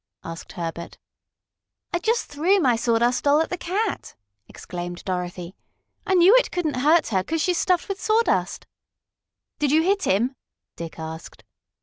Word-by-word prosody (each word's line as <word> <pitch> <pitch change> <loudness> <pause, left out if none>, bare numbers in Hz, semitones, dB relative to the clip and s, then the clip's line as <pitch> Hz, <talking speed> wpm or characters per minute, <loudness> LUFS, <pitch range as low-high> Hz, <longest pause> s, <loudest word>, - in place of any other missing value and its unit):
asked 165 0 -8
Herbert. 170 -1 -6 1.0
"I 345 - +1
just 455 +5 0
threw 335 +8 +1
my 255 -8 +3
Sawdust 235 +1 +1
Doll 290 +1 +5
at 320 - -1
the - - 0
cat!" 395 +4 -3 0.3
exclaimed 175 0 -7
Dorothy. 180 -1 -4 0.5
"I 380 - +2
knew 365 +6 +7
it - - +2
couldn't 320 -6 -2
hurt 310 +6 +3
her, 190 -4 +1
'cause 325 +10 -2
she's 360 -2 +1
stuffed 360 -2 +1
with 395 -1 -5
sawdust." 445 +2 +1 0.9
"Did 290 -2 +1
you 315 +2 +4
hit 390 +2 +1
him?" 235 +8 +1 0.4
Dick 165 -1 -8
asked. 160 0 -8
290 Hz, 150 wpm, -23 LUFS, -, 1.0 s, knew